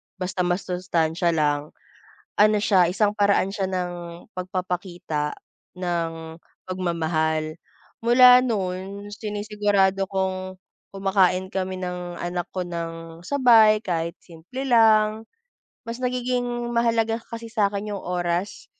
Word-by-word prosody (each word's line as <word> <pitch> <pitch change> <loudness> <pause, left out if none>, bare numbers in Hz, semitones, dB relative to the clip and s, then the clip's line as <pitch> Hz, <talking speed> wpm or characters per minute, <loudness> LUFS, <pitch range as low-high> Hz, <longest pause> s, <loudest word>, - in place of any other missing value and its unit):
basta 185 -1 -2
masustansiya 175 -2 0
lang. 145 -1 0 0.6
Ano 210 0 +5
siya, 190 -4 +4
isang 205 +2 +1
paraan 200 -2 +3
siya 195 -2 -1
ng 180 -1 -2 0.4
pagpapakita, 180 -4 -3 0.5
ng 165 -2 -3 0.3
pagmamahal. 160 -3 -1 0.5
Mula 250 +1 +7
noon, 200 -3 -3
sinisigurado 205 -2 0
kong, 185 -1 -2 0.3
kumakain 190 -2 +2
kami 190 -1 -3
ng 180 -1 -5
anak 175 0 -2
ko 185 - -2
nang 165 -1 -6
sabay 230 -5 +5
kahit 170 -5 -2
simple 175 +10 -9
lang. 220 -2 +4 0.6
Mas 235 +2 -5
nagiging 250 0 -1 0.3
mahalaga 230 -1 +1
kasi 230 0 -7
sa'kin 210 -2 -1
'yong 200 - -5
oras, 175 +2 -2
185 Hz, 105 wpm, -24 LUFS, 175-215 Hz, 0.6 s, Mula